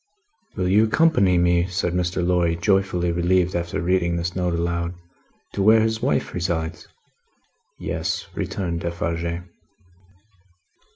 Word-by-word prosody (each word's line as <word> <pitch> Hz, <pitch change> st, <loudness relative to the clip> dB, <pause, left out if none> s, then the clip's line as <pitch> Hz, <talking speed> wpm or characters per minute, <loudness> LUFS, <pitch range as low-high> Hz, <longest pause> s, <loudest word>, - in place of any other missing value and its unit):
"Will 90 Hz, -, -1 dB
you 105 Hz, +4 st, +4 dB
accompany 110 Hz, -, +3 dB
me," 85 Hz, 0 st, +3 dB
said 90 Hz, -1 st, -2 dB
Mr. 90 Hz, 0 st, -1 dB
Lorry, 85 Hz, -2 st, +2 dB
joyfully 90 Hz, -1 st, +1 dB
relieved 90 Hz, +1 st, +1 dB
after 85 Hz, 0 st, -2 dB
reading 85 Hz, -1 st, +1 dB
this 85 Hz, 0 st, -3 dB
note 90 Hz, -2 st, 0 dB
aloud, 85 Hz, +1 st, -2 dB, 0.6 s
"to 100 Hz, -, -2 dB
where 110 Hz, +3 st, +6 dB
his 110 Hz, 0 st, 0 dB
wife 130 Hz, -, 0 dB
resides?" 80 Hz, -3 st, -3 dB, 0.9 s
"Yes," -, -, -3 dB
returned 85 Hz, -3 st, -3 dB
Defarge. 85 Hz, 0 st, -3 dB
90 Hz, 120 wpm, -23 LUFS, 85-95 Hz, 0.9 s, where